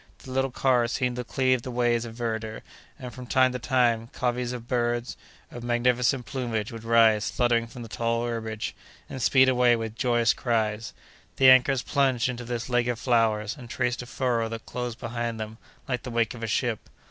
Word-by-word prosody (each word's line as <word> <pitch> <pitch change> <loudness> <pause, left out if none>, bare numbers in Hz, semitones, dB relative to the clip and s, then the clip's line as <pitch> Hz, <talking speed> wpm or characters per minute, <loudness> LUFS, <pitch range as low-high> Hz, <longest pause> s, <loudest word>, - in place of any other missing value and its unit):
The 130 - -9
little 135 +1 +1
car 125 -1 +2
seemed 125 +1 -1
to 125 - -2
cleave 130 0 +1
the 130 - -7
waves 120 -1 +1
of 115 -1 -9
verdure, 110 -2 -4 0.3
and, 125 -2 -8
from 125 -1 -9
time 130 0 +4
to 125 - -4
time, 120 -3 +1
coveys 125 -1 -2
of 120 -2 -7
birds 120 -1 -1 0.4
of 120 - -8
magnificent 120 +1 +1
plumage 115 -3 -3
would 115 -1 -8
rise 115 -2 +4
fluttering 120 -2 +1
from 120 +1 -9
the - - -8
tall 115 +1 -1
herbage, 110 -2 -4 0.3
and 130 - -7
speed 130 +2 +5
away 125 -2 +4
with 115 -1 -4
joyous 120 -2 +2
cries. 110 -2 -1 0.4
The 130 -1 +7
anchors 130 0 +4
plunged 130 -4 +1
into 120 0 -5
this 120 -1 -4
lake 120 -1 +1
of 120 -1 -1
flowers, 115 -2 +1
and 125 -5 -11
traced 125 -1 -1
a 125 - -9
furrow 120 -3 -1
that 115 0 -7
closed 125 -2 -5
behind 115 -1 -3
them, 110 +1 -6 0.3
like 125 -2 -2
the 125 - -7
wake 115 -2 0
of 120 - -10
a 115 - -3
ship. 115 0 -1
120 Hz, 195 wpm, -26 LUFS, 115-125 Hz, 0.4 s, The